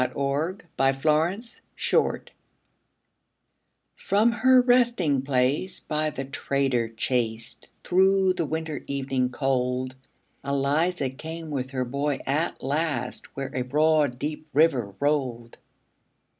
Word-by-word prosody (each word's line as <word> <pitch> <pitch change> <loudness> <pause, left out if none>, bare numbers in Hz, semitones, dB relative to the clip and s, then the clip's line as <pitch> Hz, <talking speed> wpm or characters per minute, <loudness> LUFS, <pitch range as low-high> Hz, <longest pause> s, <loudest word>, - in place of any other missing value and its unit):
ELIZA 140 +7 -1 0.2
CROSSING 150 +8 +2
THE 235 -1 -13 0.3
RIVER - - +2 1.7
From 215 +4 +2
her 255 +2 +5
resting 240 - +3
place 135 +6 0
by 155 0 -1
the 135 -2 -5
trader 135 -3 -1
chased, 115 0 -2 0.2
Through 190 +1 +3
the 170 -3 -1
winter 160 -1 -4
evening 135 -2 -1
cold, 130 -1 -1 0.5
Eliza 140 +2 0
came 160 +3 -7
with 130 -2 -3
her 130 -2 -2
boy 140 +3 -1
at 155 +5 -1
last, 140 -3 -2
Where 135 0 -4
a 130 - -1
broad 150 0 +2
deep 150 +3 -4
river 135 -10 +2
rolled. 130 -5 -1
140 Hz, 110 wpm, -26 LUFS, 130-160 Hz, 1.7 s, her